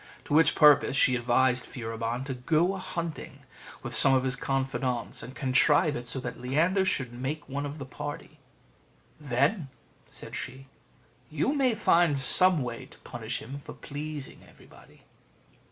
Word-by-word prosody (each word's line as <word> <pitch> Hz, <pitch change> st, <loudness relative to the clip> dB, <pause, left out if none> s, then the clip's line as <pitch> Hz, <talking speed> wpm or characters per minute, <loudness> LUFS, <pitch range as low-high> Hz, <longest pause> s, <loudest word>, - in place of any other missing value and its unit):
To -, -, -4 dB
which 160 Hz, +2 st, +4 dB
purpose 150 Hz, -3 st, +5 dB
she 130 Hz, -2 st, +4 dB
advised 125 Hz, +1 st, +1 dB
Furibon 115 Hz, +1 st, -5 dB
to 135 Hz, -, -4 dB
go 160 Hz, +8 st, +1 dB
a 195 Hz, -, -6 dB
hunting 170 Hz, -3 st, -6 dB, 0.4 s
with -, -, -6 dB
some 135 Hz, -1 st, +8 dB
of 130 Hz, -, +1 dB
his 130 Hz, 0 st, -1 dB
confidants, 135 Hz, -3 st, -2 dB
and 125 Hz, +4 st, -10 dB
contrive 145 Hz, +3 st, +2 dB
it 120 Hz, 0 st, -6 dB
so 125 Hz, +3 st, -2 dB
that 120 Hz, -, -7 dB
Leander 165 Hz, +10 st, +1 dB
should 130 Hz, -9 st, -2 dB
make 135 Hz, +5 st, -5 dB
one 140 Hz, +1 st, -4 dB
of 145 Hz, +2 st, -8 dB
the 140 Hz, -, -7 dB
party. 145 Hz, +3 st, -8 dB, 0.8 s
"Then," 140 Hz, -, 0 dB, 0.4 s
said -, -, -8 dB
she, 135 Hz, +1 st, -7 dB, 0.6 s
"you 155 Hz, -, -1 dB
may 265 Hz, -5 st, +1 dB
find 170 Hz, -7 st, +3 dB
some 175 Hz, +3 st, +5 dB
way 125 Hz, +1 st, -7 dB
to 150 Hz, -, -16 dB
punish 115 Hz, 0 st, -6 dB
him 140 Hz, +4 st, -8 dB
for -, -, -9 dB
pleasing 145 Hz, -1 st, -7 dB
everybody." -, -, -19 dB
135 Hz, 155 wpm, -27 LUFS, 125-155 Hz, 0.8 s, some